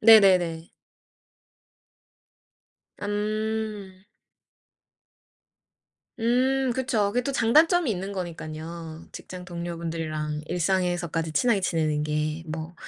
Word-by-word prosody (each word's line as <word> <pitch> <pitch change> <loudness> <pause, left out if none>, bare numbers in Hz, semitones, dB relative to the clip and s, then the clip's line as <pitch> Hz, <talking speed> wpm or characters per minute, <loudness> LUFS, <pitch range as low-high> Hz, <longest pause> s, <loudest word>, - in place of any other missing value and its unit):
네네네. 185 -7 +6 2.3
음. 210 -1 -2 2.2
음 255 +3 +2
그쵸. 235 -5 +1
그게 245 - +2
또 275 - -2
장단점이 300 +5 +4
있는 195 +1 -3
거니깐요. 165 -2 -6
직장 180 -1 -8
동료분들이랑 165 -3 -4
일상에서까지 175 -2 0
친하게 235 +3 +3
지내는 155 -5 0
게 155 +1 -1
뭐 160 +2 -5
180 Hz, 195 characters per minute, -26 LUFS, 165-220 Hz, 2.3 s, 네네네